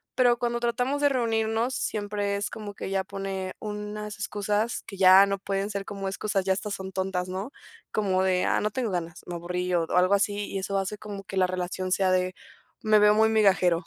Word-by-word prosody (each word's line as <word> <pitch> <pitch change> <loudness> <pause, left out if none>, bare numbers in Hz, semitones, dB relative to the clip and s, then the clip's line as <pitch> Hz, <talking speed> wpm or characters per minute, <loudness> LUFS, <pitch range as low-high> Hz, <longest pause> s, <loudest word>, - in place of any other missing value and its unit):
Pero, 245 -2 +4
cuando 240 0 -1
tratamos 245 +4 0
de 285 - +5
reunirnos 225 -1 0
siempre 205 -1 -2
es 205 - -2
como 210 -2 -7
que - - -7
ella 195 0 -1
pone 195 -1 -5
unas 210 0 -5
excusas 210 +2 -1
que 195 - -8
ya 190 +1 +8
no 195 0 -1
pueden 195 +1 -2
ser 200 -1 -4
como 195 -1 -5
excusas 195 0 -1
ya 190 0 +2
hasta 205 +2 -4
son 190 -1 -5
tontas, 185 -1 -2
¿no? 195 +8 -4 0.4
Como 190 -3 +1
de: 185 -1 +2
"Ah, - - +2
no 210 - -1
tengo 240 -1 -2
ganas, 175 -2 -4
me 175 - -5
aburrí", 180 +1 -3
o 165 -1 +2
algo 185 +2 +5
así 205 0 +1
y 195 - -4
eso 195 +1 -1
hace 195 +2 -3
como 205 -2 -8
que 195 0 -7
la 185 - +4
relación 185 0 -3
sea 190 0 +2
de 185 0 +1 0.5
me 215 -1 +5
veo 210 0 +6
muy 220 0 +4
migajero 190 -5 +3
200 Hz, 210 wpm, -27 LUFS, 185-215 Hz, 0.5 s, ya